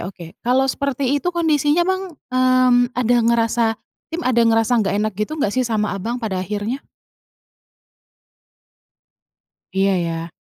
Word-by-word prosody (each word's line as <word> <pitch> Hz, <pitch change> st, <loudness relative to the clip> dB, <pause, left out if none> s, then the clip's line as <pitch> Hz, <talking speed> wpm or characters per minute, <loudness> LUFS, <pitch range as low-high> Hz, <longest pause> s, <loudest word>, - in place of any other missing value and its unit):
oke, 180 Hz, -3 st, -10 dB
kalau 255 Hz, +2 st, +2 dB
seperti 280 Hz, 0 st, -1 dB
itu 355 Hz, -, -2 dB
kondisinya, 310 Hz, -1 st, +2 dB
Bang, 375 Hz, -1 st, -2 dB, 0.2 s
mmm, 255 Hz, -1 st, +3 dB
ada 245 Hz, 0 st, +2 dB
ngerasa 235 Hz, 0 st, +2 dB, 0.4 s
tim 330 Hz, +2 st, -4 dB
ada 250 Hz, -2 st, +2 dB
ngerasa 225 Hz, 0 st, +3 dB
nggak 200 Hz, -1 st, 0 dB
enak 215 Hz, -, -1 dB
gitu 215 Hz, -, -2 dB
nggak 210 Hz, -9 st, 0 dB
sih 255 Hz, -, 0 dB
sama 215 Hz, -2 st, 0 dB
Abang 210 Hz, +5 st, -3 dB
pada 215 Hz, -7 st, -3 dB
akhirnya? 210 Hz, +7 st, -3 dB, 2.9 s
Iya, 195 Hz, 0 st, +2 dB
ya. 165 Hz, 0 st, -3 dB
245 Hz, 130 wpm, -20 LUFS, 210-275 Hz, 2.9 s, mmm